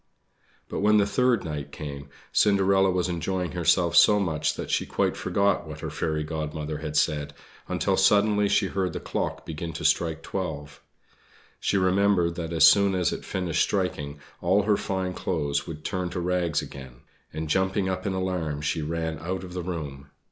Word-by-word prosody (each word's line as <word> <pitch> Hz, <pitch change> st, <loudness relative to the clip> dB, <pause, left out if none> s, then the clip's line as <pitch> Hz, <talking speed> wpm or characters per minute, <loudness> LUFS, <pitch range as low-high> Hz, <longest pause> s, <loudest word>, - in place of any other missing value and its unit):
But -, -, -4 dB
when 105 Hz, +1 st, +4 dB
the 100 Hz, -, +4 dB
third 125 Hz, +2 st, +2 dB
night 75 Hz, -3 st, -5 dB
came 70 Hz, -2 st, -7 dB, 0.2 s
Cinderella 95 Hz, -1 st, +4 dB
was 90 Hz, 0 st, 0 dB
enjoying 90 Hz, +1 st, -2 dB
herself 85 Hz, -1 st, +2 dB
so 105 Hz, +4 st, +7 dB
much 80 Hz, -6 st, 0 dB
that -, -, -5 dB
she -, -, 0 dB
quite -, -, 0 dB
forgot 100 Hz, 0 st, 0 dB
what -, -, -8 dB
her -, -, -4 dB
Fairy 80 Hz, -1 st, -1 dB
Godmother 75 Hz, -1 st, -4 dB
had 75 Hz, -1 st, -3 dB
said, 75 Hz, -1 st, 0 dB, 0.3 s
until -, -, 0 dB
suddenly 105 Hz, 0 st, +4 dB
she 100 Hz, -, +3 dB
heard 95 Hz, -2 st, -2 dB
the -, -, -3 dB
clock -, -, -3 dB
begin 80 Hz, +1 st, -5 dB
to -, -, -5 dB
strike 80 Hz, -1 st, +1 dB
twelve. 75 Hz, -6 st, -5 dB, 0.8 s
She 100 Hz, -, +1 dB
remembered 95 Hz, -2 st, +3 dB
that 85 Hz, -1 st, -5 dB
as 80 Hz, -1 st, +7 dB
soon 100 Hz, +2 st, +5 dB
as 90 Hz, -3 st, +1 dB
it -, -, -6 dB
finished 90 Hz, -3 st, -1 dB
striking, 75 Hz, -7 st, -1 dB, 0.2 s
all 95 Hz, +4 st, +3 dB
her 105 Hz, 0 st, +3 dB
fine 95 Hz, -2 st, -2 dB
clothes 75 Hz, -6 st, -2 dB
would 75 Hz, -2 st, -8 dB
turn 90 Hz, -2 st, -2 dB
to 90 Hz, -, -4 dB
rags 90 Hz, -3 st, 0 dB
again; 65 Hz, -3 st, -11 dB, 0.3 s
and, 80 Hz, 0 st, -4 dB
jumping 95 Hz, +4 st, +1 dB
up 95 Hz, +2 st, -2 dB
in 95 Hz, -, -1 dB
alarm, 90 Hz, -6 st, -2 dB
she 80 Hz, +2 st, -1 dB
ran 80 Hz, +1 st, -3 dB
out 90 Hz, +4 st, -4 dB
of 90 Hz, -1 st, -9 dB
the 90 Hz, -, -3 dB
room. 75 Hz, -6 st, -6 dB
85 Hz, 180 wpm, -26 LUFS, 75-95 Hz, 0.8 s, so